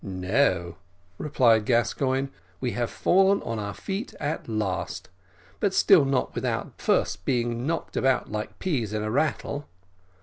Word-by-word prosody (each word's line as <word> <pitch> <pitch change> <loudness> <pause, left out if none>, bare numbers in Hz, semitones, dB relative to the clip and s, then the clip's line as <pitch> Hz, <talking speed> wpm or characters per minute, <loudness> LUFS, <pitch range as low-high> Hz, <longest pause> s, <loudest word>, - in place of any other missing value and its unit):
"No," 95 -1 0 0.4
replied 120 -7 +3
Gascoigne; 130 +3 +1 0.3
"we 125 - -1
have 120 -1 -1
fallen 195 +2 +3
on 115 -1 -3
our 100 -1 -4
feet 200 +5 -5
at 145 -4 -3
last, 105 -5 -3 0.5
but 200 -2 +1
still 170 -8 +6
not 135 -1 0
without - - -3
first - - +1
being 120 -1 -1
knocked 165 0 -3
about 130 -4 +1
like 105 0 -4
peas 125 - -1
in 105 0 -1
a 110 - -2
rattle. 145 +1 -1
125 Hz, 140 wpm, -26 LUFS, 110-145 Hz, 0.5 s, still